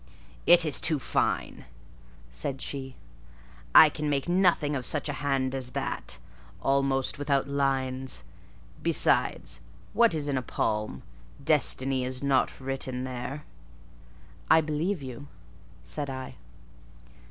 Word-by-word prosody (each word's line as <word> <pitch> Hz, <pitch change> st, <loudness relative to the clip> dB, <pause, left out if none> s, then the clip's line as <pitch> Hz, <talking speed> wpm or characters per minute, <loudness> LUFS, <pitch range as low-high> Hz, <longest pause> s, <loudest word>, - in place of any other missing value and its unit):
"It 175 Hz, -1 st, +8 dB
is 150 Hz, -, +1 dB
too 160 Hz, -2 st, +4 dB
fine," 135 Hz, -, -1 dB, 0.7 s
said -, -, -3 dB
she. 135 Hz, -2 st, -5 dB, 0.8 s
"I 160 Hz, -, +11 dB
can 150 Hz, 0 st, -3 dB
make 140 Hz, -2 st, 0 dB
nothing 175 Hz, -5 st, +2 dB
of 130 Hz, -, -3 dB
such 150 Hz, +4 st, -1 dB
a 145 Hz, -, -2 dB
hand 135 Hz, -2 st, 0 dB
as 130 Hz, -2 st, -3 dB
that; -, -, -3 dB, 0.4 s
almost 135 Hz, 0 st, +1 dB
without 140 Hz, -1 st, +1 dB
lines: 135 Hz, -2 st, -1 dB, 0.6 s
besides, -, -, +1 dB, 0.3 s
what 230 Hz, -7 st, +4 dB
is 150 Hz, -2 st, -2 dB
in 135 Hz, -2 st, 0 dB
a -, -, -4 dB
palm? 105 Hz, -, -2 dB, 0.4 s
Destiny 130 Hz, 0 st, +2 dB
is 130 Hz, +1 st, -2 dB
not 135 Hz, -2 st, +1 dB
written 130 Hz, -1 st, -2 dB
there." 130 Hz, +3 st, -5 dB, 1.0 s
"I 160 Hz, -, +7 dB
believe 160 Hz, +2 st, -1 dB
you," 130 Hz, +2 st, -8 dB, 0.6 s
said 140 Hz, -, -2 dB
I. 130 Hz, -1 st, -7 dB
135 Hz, 120 wpm, -28 LUFS, 130-145 Hz, 1.0 s, I